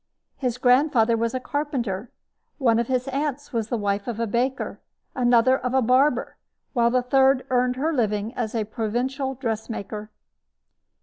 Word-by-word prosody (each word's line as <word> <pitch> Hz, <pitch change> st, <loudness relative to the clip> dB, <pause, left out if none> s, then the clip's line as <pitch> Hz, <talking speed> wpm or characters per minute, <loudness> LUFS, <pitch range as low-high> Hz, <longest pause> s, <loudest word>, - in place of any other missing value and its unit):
His 250 Hz, -3 st, -2 dB
grandfather 250 Hz, -3 st, +4 dB
was 230 Hz, +2 st, -1 dB
a -, -, 0 dB
carpenter. 250 Hz, -7 st, -3 dB, 0.5 s
One 235 Hz, -5 st, +3 dB
of 235 Hz, -, -1 dB
his 255 Hz, 0 st, -1 dB
aunts 285 Hz, 0 st, -3 dB
was 225 Hz, -2 st, -1 dB
the 240 Hz, -, 0 dB
wife 200 Hz, 0 st, -1 dB
of 235 Hz, -2 st, -4 dB
a 230 Hz, -, +1 dB
baker, 245 Hz, +5 st, -1 dB, 0.3 s
another 245 Hz, 0 st, +4 dB
of 250 Hz, +1 st, -2 dB
a 265 Hz, -, +4 dB
barber, 255 Hz, +2 st, +2 dB, 0.4 s
while 235 Hz, -3 st, +3 dB
the 250 Hz, +1 st, +1 dB
third 265 Hz, +1 st, +3 dB
earned 250 Hz, 0 st, +2 dB
her 310 Hz, +5 st, 0 dB
living 215 Hz, -3 st, -1 dB
as 235 Hz, -2 st, -3 dB
a 220 Hz, -, +1 dB
provincial 245 Hz, +5 st, -2 dB
dressmaker. 220 Hz, -3 st, -4 dB
245 Hz, 160 wpm, -24 LUFS, 225-265 Hz, 0.5 s, grandfather